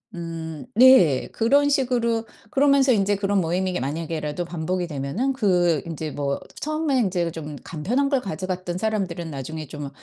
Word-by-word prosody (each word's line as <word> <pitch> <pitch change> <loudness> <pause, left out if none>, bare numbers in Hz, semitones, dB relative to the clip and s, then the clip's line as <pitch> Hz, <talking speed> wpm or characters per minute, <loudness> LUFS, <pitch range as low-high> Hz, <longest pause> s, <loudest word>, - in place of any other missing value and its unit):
음 165 -2 -6
네. 245 - +6
그런 280 +6 +3
식으로 245 -5 +1 0.3
그러면서 275 -2 +4
인제 205 -1 +2
그런 200 0 +1
모임이 180 +2 -1
만약에라도 155 +3 -3
반복이 175 +1 -2
되면은 155 - -2
그 180 - +2
인제 160 -2 -5
뭐 140 -1 -2 0.2
처음에 305 -2 0
인제 180 -6 0
좀 150 -2 -7
간편한 220 - -1
걸 275 -2 +1
가져갔던 185 -1 -4
사람들은 185 -5 -2
나중에 155 +3 -6
좀 145 0 -6
180 Hz, 330 characters per minute, -23 LUFS, 160-235 Hz, 0.3 s, 네